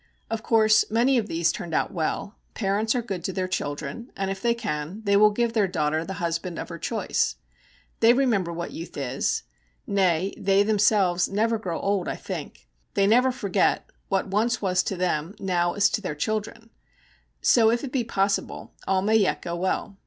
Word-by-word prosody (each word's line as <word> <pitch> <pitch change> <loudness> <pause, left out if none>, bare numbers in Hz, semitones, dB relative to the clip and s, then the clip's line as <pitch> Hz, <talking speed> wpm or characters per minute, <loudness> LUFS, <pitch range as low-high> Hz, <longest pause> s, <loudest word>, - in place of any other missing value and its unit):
Of 225 -1 -2
course 215 -1 +4
many 245 +4 +3
of 215 - -3
these 165 -2 +1
turned 165 -1 -5
out - - 0
well. 175 +5 -3 0.2
Parents 210 +2 0
are 245 - 0
good 195 -6 -5
to - - -1
their 185 0 -2
children, 145 - -4
and 195 0 -1
if 195 0 -5
they 235 0 +2
can, 190 -3 -4
they 200 -1 +2
will 210 +1 +7
give 230 +2 0
their 215 -4 +2
daughter 155 -3 0
the 190 - -5
husband 170 0 -3
of - - -5
her 170 -1 -7
choice. - - -1 0.6
They 230 +1 +6
remember 235 -9 +2
what 170 0 -5
youth 165 - -8
is 135 -1 -1 0.4
nay, 190 -2 +1
they 195 0 +3
themselves 205 -4 +3
never 225 +3 +1
grow 180 -6 -3
old, 200 -2 0
I - - -2
think; - - -7 0.3
they 200 - +3
never 250 +5 +4
forget 200 -7 0 0.2
what 195 -1 +1
once 220 +5 0
was 185 -2 +1
to 195 - -2
them 175 0 -1
now 175 -3 0
is 205 0 +4
to 210 - -1
their 165 -7 -4
children. 220 +6 -3 0.7
So 225 -2 +5
if 235 +3 0
it 270 - -5
be 260 -3 0
possible 200 -3 -1
all 190 -1 +2
may 220 +2 +4
yet 200 -3 +1
go 170 -1 -3
well. 190 +3 -2
195 Hz, 190 wpm, -25 LUFS, 175-220 Hz, 0.7 s, will